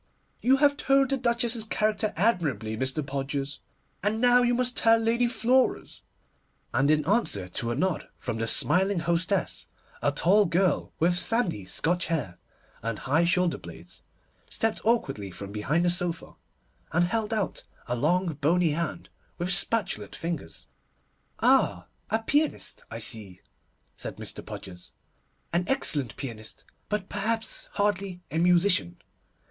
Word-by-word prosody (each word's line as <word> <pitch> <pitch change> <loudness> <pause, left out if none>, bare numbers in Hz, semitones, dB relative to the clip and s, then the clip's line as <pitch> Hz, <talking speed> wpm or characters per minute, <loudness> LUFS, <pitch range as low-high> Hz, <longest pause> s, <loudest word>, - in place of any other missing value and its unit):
'You 265 +2 +4
have 285 0 +3
told 275 -2 +3
the - - +3
Duchess's 235 -2 +2
character 215 -1 0
admirably, 150 - +1
Mr. 130 +5 -2
Podgers, 140 0 -3 0.4
and 210 +3 0
now 245 +1 +5
you 245 0 +2
must 250 0 0
tell 225 0 +5
Lady 230 +2 +2
Flora's'; 250 +2 +1 0.7
and 135 +2 +2
in 150 -1 +3
answer 175 - +1
to 115 +5 -2
a 120 - -1
nod 180 +5 -1
from 115 -3 -4
the 115 - -1
smiling 190 - +3
hostess, 170 +2 -1 0.3
a 145 - +2
tall 195 +7 +4
girl, 180 +2 +1
with 175 +2 +2
sandy 195 - +1
Scotch 170 - 0
hair, 125 - -3 0.4
and 115 0 -3
high 155 +9 +1
shoulder 180 0 +1
blades, - - -12 0.5
stepped 225 -1 -1
awkwardly 135 - 0
from 100 +2 -8
behind 145 +12 0
the 175 - +3
sofa, 175 -2 -3 0.6
and 170 +2 +3
held 220 +4 -1
out 215 -3 -2 0.2
a 120 - -2
long, 170 +7 +1
bony 160 +3 +2
hand 170 +2 -3 0.3
with 175 +1 -2
spatulate 190 - 0
fingers. 165 - -5 0.7
'Ah, 90 0 +3 0.2
a 220 +1 0
pianist! 295 +6 0
I - - -6
see,' 105 -9 0 0.6
said - - -6
Mr. - - -6
Podgers, 90 -2 -10 0.6
'an 175 +1 +2
excellent 145 - -1
pianist, 110 -5 -8 0.3
but 210 -2 -2
perhaps 220 +2 -1
hardly 195 -3 -1
a 160 - 0
musician. 175 - +3
175 Hz, 140 wpm, -27 LUFS, 140-220 Hz, 0.7 s, now